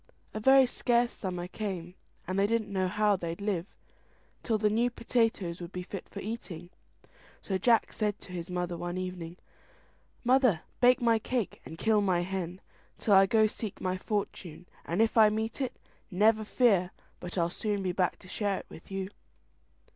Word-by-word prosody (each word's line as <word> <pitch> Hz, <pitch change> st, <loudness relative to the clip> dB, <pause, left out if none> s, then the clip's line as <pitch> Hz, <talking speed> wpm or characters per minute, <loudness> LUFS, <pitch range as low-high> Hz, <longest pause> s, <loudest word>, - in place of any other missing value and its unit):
A 215 Hz, -, -3 dB
very 265 Hz, +4 st, +7 dB
scarce 240 Hz, -1 st, +1 dB
summer 180 Hz, -2 st, -4 dB
came, 185 Hz, -3 st, -5 dB, 0.3 s
and 185 Hz, +2 st, -1 dB
they 200 Hz, -, +4 dB
didn't 220 Hz, -2 st, -1 dB
know 190 Hz, -1 st, +1 dB
how 210 Hz, +2 st, +2 dB
they'd 170 Hz, -2 st, -4 dB
live 200 Hz, -3 st, -1 dB, 0.7 s
till 225 Hz, -2 st, +1 dB
the 210 Hz, 0 st, +2 dB
new 235 Hz, +3 st, +2 dB
potatoes 225 Hz, -8 st, 0 dB
would 175 Hz, 0 st, -7 dB
be 180 Hz, -1 st, -5 dB
fit 190 Hz, +1 st, -8 dB
for -, -, -7 dB
eating. 185 Hz, -6 st, -6 dB, 0.7 s
So 190 Hz, -2 st, -1 dB
Jack 230 Hz, +3 st, +3 dB
said 210 Hz, -2 st, -1 dB
to -, -, -10 dB
his 175 Hz, 0 st, -5 dB
mother 180 Hz, -1 st, -2 dB
one 175 Hz, +1 st, -4 dB
evening, 180 Hz, -2 st, -5 dB, 0.9 s
"Mother, 250 Hz, -, +4 dB, 0.2 s
bake 250 Hz, 0 st, +5 dB
my 230 Hz, -1 st, +4 dB
cake, 240 Hz, -1 st, -2 dB
and 160 Hz, -, -9 dB
kill 215 Hz, +3 st, +3 dB
my 185 Hz, -3 st, +2 dB
hen, 180 Hz, 0 st, -4 dB, 0.4 s
till 210 Hz, -, +2 dB
I 195 Hz, 0 st, +7 dB
go 220 Hz, +1 st, +4 dB
seek 215 Hz, -1 st, -4 dB
my 185 Hz, 0 st, -1 dB
fortune; 185 Hz, -4 st, -4 dB, 0.2 s
and 175 Hz, +7 st, +2 dB
if 225 Hz, 0 st, +2 dB
I 215 Hz, -1 st, +8 dB
meet 220 Hz, +5 st, -2 dB
it, 260 Hz, -, -2 dB, 0.3 s
never 215 Hz, +4 st, +3 dB
fear 205 Hz, -5 st, +3 dB, 0.3 s
but 180 Hz, +1 st, -6 dB
I'll 170 Hz, -1 st, +1 dB
soon 205 Hz, 0 st, -2 dB
be 185 Hz, -, 0 dB
back 180 Hz, 0 st, 0 dB
to -, -, -14 dB
share 200 Hz, 0 st, -1 dB
it -, -, -8 dB
with 160 Hz, -, -13 dB
you." 195 Hz, 0 st, -4 dB
195 Hz, 180 wpm, -30 LUFS, 180-220 Hz, 0.9 s, I